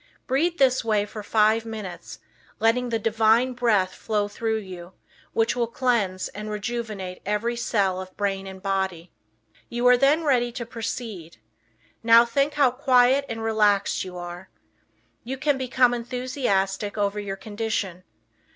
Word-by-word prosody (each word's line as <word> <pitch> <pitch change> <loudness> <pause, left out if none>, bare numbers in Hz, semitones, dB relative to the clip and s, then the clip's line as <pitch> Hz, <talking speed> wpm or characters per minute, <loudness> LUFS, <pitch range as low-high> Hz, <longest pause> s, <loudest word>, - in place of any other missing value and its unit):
Breathe 325 +6 +1
this 260 -2 +3
way 215 -2 +1
for 210 +1 -8
five 215 +1 +2
minutes, 215 -5 -7 0.4
letting 240 +2 +2
the 230 - 0
Divine 225 +3 +2
Breath 215 -7 +1
flow 210 -2 -1
through 220 +2 -2
you, 185 -3 -9 0.4
which 225 +2 +1
will 240 -2 0
cleanse 225 -7 0
and 210 +1 -7
rejuvenate 210 -4 -4
every 210 +4 -1
cell 200 -6 0
of 185 0 -11
brain 195 -1 -2
and 190 -1 -10
body. 190 -3 -2 0.6
You 240 +1 -2
are 250 0 +7
then 285 +5 +3
ready 245 -5 +2
to 240 -2 -5
proceed. 225 - -6 0.6
Now 230 +1 +7
think 275 +5 0
how 280 -4 +4
quiet 255 +1 +3
and 225 -1 -4
relaxed 210 -3 +2
you 180 -1 -8
are. 175 +1 -8 0.7
You 260 +3 -5
can 285 0 +1
become 250 -1 +3
enthusiastic 235 -5 -2
over 205 0 0
your 200 -1 -4
condition. 205 -3 -4
225 Hz, 145 wpm, -24 LUFS, 195-245 Hz, 0.7 s, are